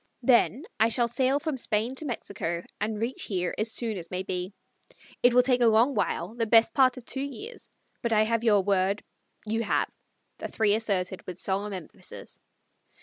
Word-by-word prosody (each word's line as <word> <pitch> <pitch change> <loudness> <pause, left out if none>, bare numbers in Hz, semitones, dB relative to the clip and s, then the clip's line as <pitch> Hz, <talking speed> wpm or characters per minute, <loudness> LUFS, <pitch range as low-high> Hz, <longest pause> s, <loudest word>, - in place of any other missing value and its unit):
Then 255 +3 +3 0.2
I 225 - +5
shall 235 +1 +2
sail 260 +4 +1
from 310 -3 -3
Spain 225 +1 -1
to 310 - -2
Mexico 180 - -4 0.2
and 215 0 -2
reach 235 +4 -3
here 180 -3 -2
as 220 +1 +1
soon 225 -3 -2
as 170 - -9
may 185 +1 -3
be. 180 0 -4 0.7
It 245 0 +5
will 250 - +7
take 250 -1 +2
a 235 - +6
long 230 +5 +4
while, 210 0 -1
the 230 -1 -1
best 225 +8 +5
part 260 -2 +4
of 250 - -10
two 270 - -3
years; 405 - -7 0.3
but 235 - -1
I 215 -1 +4
have 230 +1 0
your 210 -4 +4
word 195 +1 +1 0.2
" - - -29
"You 225 +2 0
have," 220 - 0 0.5
the - - -4
three 215 -2 +2
asserted 195 -4 -1
with 180 -2 -6
solemn 200 +1 -2
emphasis. 180 -5 -9
225 Hz, 195 wpm, -27 LUFS, 200-245 Hz, 0.7 s, will